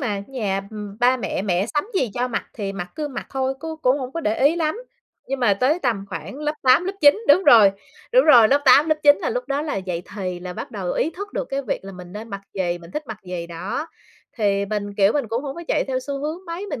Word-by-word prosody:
mà, 205 -7 -2
nhà, 210 -7 -2
ừm, 210 -1 -8
ba 250 +1 +4
mẹ, 230 - -3
mẹ 190 -1 0
sắm 295 - +1
gì 260 - +1
cho 250 +1 -1
mặc 230 - -2
thì 200 -3 -4
mặc 180 -2 -5
cứ 300 -1 -3
mặc 270 - -6
thôi, 265 0 -1
cứ 320 0 -5
cũng 255 +3 +3
hổng 255 -1 -5
có 335 - -3
để 215 -6 0
ý 325 - +2
lắm. 325 +7 -1 0.5
Nhưng 270 0 -2
mà 210 -5 +4
tới 270 - +2
tầm 230 - -1
khoảng 265 +6 -7
lớp 300 0 -2
8, 260 +6 +5
lớp 385 - -2
9, 295 +9 +6
đúng 360 +7 +6
rồi, 205 -4 +7 0.4
đúng - - +6
rồi, 240 -8 +7
lớp 280 +3 +3
8, 285 +4 +6
lớp 310 - +3
9 290 0 +6
là - - -2
lúc - - -2
đó 280 +1 0
là 305 -9 -3
dậy 180 -3 -3
thì 185 -3 -4
là 180 0 -6
bắt - - -7
đầu 190 -4 -3
ý 320 - 0
thức 405 +4 -8
được - - -2
cái 275 0 -3
việc 245 - -3
là 195 - -8
mình 180 -1 -11
nên 215 +3 -8
mặc 200 -2 -6
gì, 175 -3 -1
mình 170 0 -13
thích 300 - -4
mặc 220 -2 -6
gì 180 -2 -5
đó, 190 - -4 0.5
thì 200 -3 +1
mình, 205 -1 -3
kiểu, 200 +1 +4
mình 280 -6 -1
cũng 230 +5 -2
hổng 275 -2 -5
có 340 - -6
chạy - - +1
theo 260 -1 -1
xu 275 +1 -5
hướng 315 +6 -4
mấy, 340 +4 -5
mình 290 - -5
250 Hz, 270 wpm, -22 LUFS, 200-295 Hz, 0.5 s, rồi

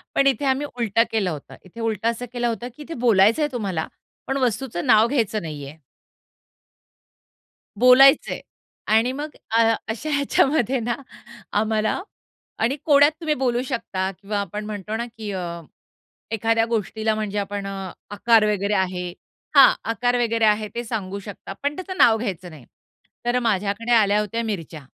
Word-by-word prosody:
पण 275 - +3
इथे 275 +1 +2
आम्ही 270 +2 +1
उलट 230 -3 -2
केलं 210 -5 +1
होतं. 150 -4 -8
इथे 185 +5 -12
उलट 225 -1 -2
असं 235 +1 0
केलं 240 -1 -1
होतं, 235 +1 -4
की 300 - -9
इथे 330 +3 -7
बोलायचंय 225 +7 +4
तुम्हाला, 195 -9 -2 0.4
पण 270 - -1
वस्तूचं 245 -6 -1
नाव 220 -1 +5
घ्यायचं 220 -5 0
नाहीये. 150 -2 -7 2.0
बोलायचं 265 +4 +6
आहे - - -5 0.6
आणि 245 +3 0
मग 290 +3 -4 0.2
अ, 225 0 +4
अशा 230 +8 -4
ह्याच्यामध्ये 270 -2 +2
ना 235 +1 -1 0.7
आम्हाला 220 +3 0 0.6
आणि 245 +5 +1
कोड्यात 290 -1 +6
तुम्ही 315 -2 0
बोलू 250 -3 0
शकता 195 -7 -2
किंवा 205 +1 -3
आपण 210 +1 -5
म्हणतो 210 0 -5
ना 235 +1 -3
की 215 -2 -6
अ, 175 -2 -4 0.7
एखाद्या 225 +1 +1
गोष्टीला 220 -1 -1
म्हणजे 210 -1 -3
आपण 200 0 -4
अ, 195 -2 -5 0.2
आकार 220 +1 +4
वगैरे 200 +1 -1
आहे. 180 -2 -1 0.4
हां, 275 - +9 0.2
आकार 245 +3 0
वगैरे 230 -1 +1
आहे 215 0 +2
ते 240 - -2
सांगू 200 -4 -4
शकता, 200 -1 -8
पण 290 +1 0
त्याचं 370 +2 -6
नाव 225 -2 +6
घ्यायचं 185 -6 -4
नाही. 150 -7 -13 0.6
तर 240 +1 +2
माझ्याकडे 215 0 -1
आल्या 210 -2 +4
होत्या 220 +2 -2
मिरच्या. 165 -9 -5
225 Hz, 155 wpm, -23 LUFS, 200-245 Hz, 2.0 s, हां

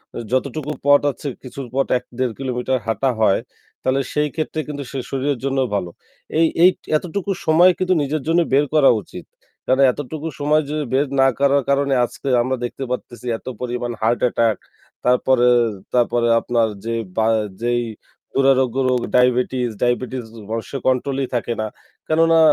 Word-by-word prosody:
আ - - -4
যতটুকু 140 +3 -1
পথ 145 0 +6
আছে 145 - -8 0.2
কিছুর 130 0 -7
পথ 135 - +1
১-১.৫ 125 -1 -4
কিলোমিটার 130 0 -1
হাঁটা 130 +4 +1
হয় 100 -3 +4 0.4
তাহলে 135 +1 +1
সেই 150 0 +1
ক্ষেত্রে 155 0 -3
কিন্তু 145 -1 -5
সে 135 - -5
শরীরের 135 -1 -1
জন্য 135 0 0
ভালো। 90 -4 -1 0.5
এই 165 - +5 0.2
এই 180 - +9 0.3
এতটুকু 190 +4 -4
সময় 170 +4 +6
কিন্তু 185 0 +1
নিজের 145 +1 -1
জন্য 170 +1 +3
বের 145 +2 +4
করা 145 -3 +6
উচিত। - - -10 0.4
কেননা 130 +1 +3
এতটুকু 150 +3 -6
সময় 150 +1 +2
যদি 150 0 -2
বের 140 +2 +2
না 135 - +6
করার 140 -1 +3
কারণে 140 0 +2
আজকে 140 - -10
আমরা 130 +1 -1
দেখতে 135 - -6
পারতেছি 125 -1 -5
এত - - -20
পরিমাণ 120 -1 -3
হার্ট 115 +2 +2
অ্যাটাক 115 -3 +2 0.5
তারপরে, 125 0 +3 0.5
তারপরে 120 -1 +2
আপনার 115 -2 +1 0.2
যে 115 0 -1 0.2
বা 110 0 +3 0.3
যেই 120 0 +1 0.5
দুরারোগ্য 135 -2 +3
রোগ, 125 -1 +2 0.2
ডায়াবেটিস, 125 0 +2
ডায়াবেটিস 125 +1 0 0.3
মানুষের 115 +4 -4
কন্ট্রোল 130 +1 +1
ই - - -10
থাকে 120 0 -1
না। 110 - -2 0.4
কেননা 165 +1 +4
130 Hz, 160 wpm, -20 LUFS, 120-145 Hz, 0.5 s, এই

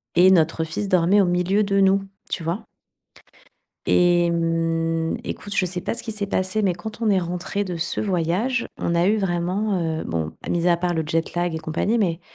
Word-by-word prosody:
et 180 +2 +7
notre 165 -3 +3
fils 195 +5 -4
dormait 185 +3 +4
au - - +3
milieu 180 +4 +2
de 200 -1 +1
nous, 195 0 +4 0.3
tu 170 - -3
vois? 175 +7 -3 1.2
Et 175 -1 +4
mmh, 165 -1 0
écoute, 205 -1 -6
je 185 - +2
sais 180 0 -4
pas - - -2
ce - - -4
qui 225 - -4
s'est 205 -1 -3
passé, 190 +2 0
mais 190 -3 +2
quand 220 +6 -8
on 220 - +2
est 195 - +4
rentrés 180 +3 -3
de 180 -3 -4
ce 165 - -2
voyage, 195 +7 0
on 170 - -1
a 170 +2 +3
eu 215 - +3
vraiment, 190 +2 0
heu, 160 -1 -2
bon, 80 -1 -3
mis 175 0 0
à 170 -1 +4
part 175 0 -1
le 160 - 0
jet-lag 165 +2 -1
et - - -1
compagnie, 160 +8 -1
mais 175 -5 0
175 Hz, 205 wpm, -23 LUFS, 165-200 Hz, 1.2 s, et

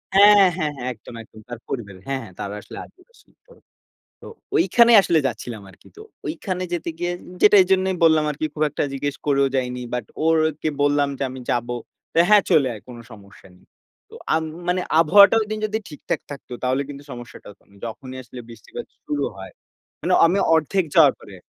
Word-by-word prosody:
হ্যাঁ, 205 +1 +8 0.2
হ্যাঁ, 155 -4 -1
হ্যাঁ। 125 -1 -5
একদম, 110 - -14
একদম। 110 -1 -17
তার 120 -1 -7
পরিবারের। 100 -7 -6
হ্যাঁ, 135 -1 -2
হ্যাঁ। 100 -5 -13
তারা 100 0 -5
আসলে - - -12
আদিবাসী। 375 +7 -24 0.9
তো - - -11 0.3
ও - - +3
ঐখানেই 235 - +5
আসলে 170 -4 +2
যাচ্ছিলাম 115 -2 -6
আরকি। 95 - -19
তো - - -10 0.3
ঐখানে 185 - -4
যেতে 170 -1 -3
গিয়ে 175 +1 -2 0.2
উ - - -12
যে - - +9
এই 185 - +3
জন্যই 190 0 +2
বললাম 160 -1 +5
আরকি, 150 +2 -4
খুব 155 - -1
একটা - - -2
জিজ্ঞেস 145 +1 -3
করেও 140 -1 +3
যাইনি। 125 -1 -2
বাট 125 -3 -2 0.2
ওরকে 160 -1 +1
বললাম 145 0 +2
যে 140 - -2
আমি 130 +1 -8
যাবো। 120 0 -1 0.4
তো - - -5
"হ্যাঁ, 210 -2 +6
চলে 140 -4 +4
আয়। 105 - -10
কোন 125 - -10
সমস্যা 100 -3 -15
নেই।" - - -24 0.4
তো - - -19 0.2
আম 160 - 0 0.2
মানে 180 +1 +1 0.2
আবহাওয়াটা 200 +7 +7
ঐদিন 215 0 -4
যদি 215 +1 -2
ঠিকঠাক 150 - -4
থাকতো 140 -3 -9
তাহলে 130 +2 +1
কিন্তু 140 0 -9
সমস্যাটা 120 0 -11
হত 100 - -21
না। 100 - -22
যখনই 130 +3 -8
আসলে 125 +1 -11
বৃষ্টিপাত 115 -2 -9 0.2
শুরু 145 -1 -2
হয়। 95 0 -10 0.5
মানে - - 0
আমি 180 +4 +1 0.2
অর্ধেক 165 +4 +1
যাওয়ার - - +7
পরে - - -14
আর - - -22
145 Hz, 195 wpm, -22 LUFS, 120-180 Hz, 0.9 s, যে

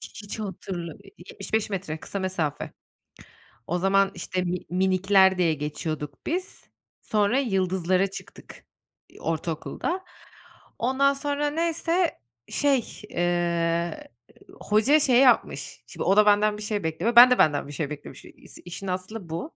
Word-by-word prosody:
H - - -8
hiç 205 +1 -7
hatırla 180 -4 -5 0.3
75 220 -1 -3
metre 180 -5 -4
kısa 200 - -5
mesafe. 185 -6 -3 1.0
O 175 +2 -1
zaman 195 +1 +3
işte 185 +1 -3
mi 180 0 -1
minikler 190 +1 +3
diye 170 -3 +2
geçiyorduk 150 -1 -5
biz. 365 +3 -4 0.4
Sonra 210 +4 +1
yıldızlara 190 -5 +1
çıktık, 195 - -12 0.5
ııı, - - -16
ortaokulda. 165 - -3 0.8
Ondan 265 +3 +2
sonra 290 +1 -1
neyse 335 +2 0 0.3
şey, 275 -5 0
eee, 175 - -1 0.5
hoca 220 +9 +3
şey 255 -4 +4
yapmış. 260 -2 +2
Şimdi - - -6
o, 195 - +3
da 210 - +7
benden 210 0 +3
bir 210 - -9
şey 210 -2 -2
bekliyor, 160 +9 -1
ben 245 +1 +10
de 250 - +4
benden 145 -2 +2
bir - - -9
şey 145 -1 -3
beklemişi 150 -1 -9
i - - -18 0.2
işin 180 +2 -7
aslı 185 0 -5
bu. 170 - -5
195 Hz, 140 wpm, -25 LUFS, 175-240 Hz, 1.0 s, ben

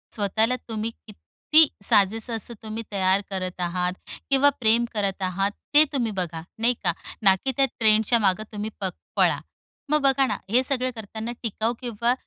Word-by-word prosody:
स्वतःला 220 +3 +1
तुम्ही 220 +1 -3 0.2
किती 305 +8 +2 0.2
साजेसं 220 +2 +2
असं 225 +2 -2
तुम्ही 220 +1 -5
तयार 190 0 +2
करत 185 -2 -4
आहात 180 +1 -1 0.4
किंवा 280 +1 +5
प्रेम 230 +1 +3
करत 200 -3 -2
आहात, 195 +2 0 0.2
ते 300 +1 +8
तुम्ही 235 -5 0
बघा, 170 -4 -3 0.2
नाही 240 +2 +3
का? 175 - +2 0.3
ना 195 -2 +6
की 265 +8 -2
त्या 275 - +5
ट्रेंडच्या 220 +1 +4
मागे 195 0 +1
तुम्ही 210 0 -4
प 195 - -1 0.3
पळा. - - +3 0.5
मग 300 0 +3
बघा 275 -1 +3
ना, - - -2
हे 250 +4 +3
सगळं 255 -1 0
करताना 220 +1 -6
टिकाऊ 225 +1 -1
किंवा 235 0 0
220 Hz, 165 wpm, -24 LUFS, 195-240 Hz, 0.5 s, ते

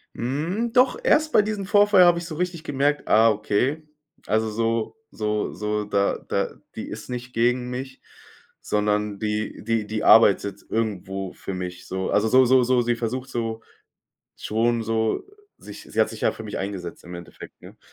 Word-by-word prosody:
Hm, 165 - -2
doch 250 0 +4
erst 310 0 +3
bei - - +6
diesem 210 -2 -3
Vorfall 205 -1 +5
habe 175 -1 +5
ich 170 - -7
so 165 -2 -6
richtig 175 -1 -3
gemerkt: 145 0 0
„Ah, 110 +1 +5
okay, 120 +8 -1 0.4
also 110 +1 +1
so 115 +1 -1 0.2
so 105 -1 -2
so 105 0 -2
da 100 -1 +1
da - - -1 0.2
die - - -6
ist - - -8
nicht 125 0 -6
gegen 125 +2 +1
mich, 130 +1 -6 0.6
sondern 105 -1 -1
die 105 0 -3
die 115 -1 0
die 110 0 -3
arbeitet 100 -2 +5
irgendwo 95 -4 -3
für 95 - -7
mich“, 90 -1 -6
so. 95 0 -3
Also, 105 +2 +2
so 130 +3 +5
so 130 +1 +5
so 125 0 +3
sie 120 0 0
versucht 125 +3 -4
so 115 -1 -3 0.7
schon 115 +1 0
so 110 0 0 0.3
sich - - -11
sie - - -5
hat - - +2
sich - - -9
ja - - +3
für 110 - -9
mich 105 -2 -5
eingesetzt 95 -3 -6
im 90 +1 -8
Endeffekt, 85 0 -12
ne? - - -14
115 Hz, 175 wpm, -24 LUFS, 105-135 Hz, 0.7 s, bei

